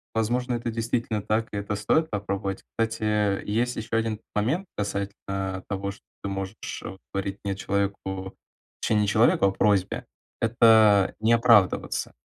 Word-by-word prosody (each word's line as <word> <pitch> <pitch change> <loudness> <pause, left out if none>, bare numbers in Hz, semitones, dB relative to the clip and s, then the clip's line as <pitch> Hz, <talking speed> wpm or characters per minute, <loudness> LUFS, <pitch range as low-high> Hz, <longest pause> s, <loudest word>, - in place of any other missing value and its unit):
Возможно, 120 +3 0
это 120 0 -2
действительно 115 -1 -1
так 110 +2 0
и - - -4
это 100 +1 -2
стоит 155 +10 +1
попробовать. 100 -1 -3
Кстати, 115 0 -2
э, 105 -2 +1
есть 120 +4 0
еще 110 +1 -6
1 110 -1 0 0.2
момент 130 - 0
касательно 95 -2 -3
того, 100 0 -3
что 100 - -15 0.2
ты 100 - -2
можешь 95 +1 -4 0.6
говорить 100 0 -3
не 100 -1 -2
человеку 95 -1 -3 0.5
точнее, 105 -1 +2
не 105 - +1
челоевку, 110 -1 +4
а 95 - +4
просьбе- 100 -1 +1 0.4
это 110 -4 +5
не 110 +2 +3
оправдываться. 115 -5 +3
105 Hz, 145 wpm, -26 LUFS, 100-115 Hz, 0.6 s, это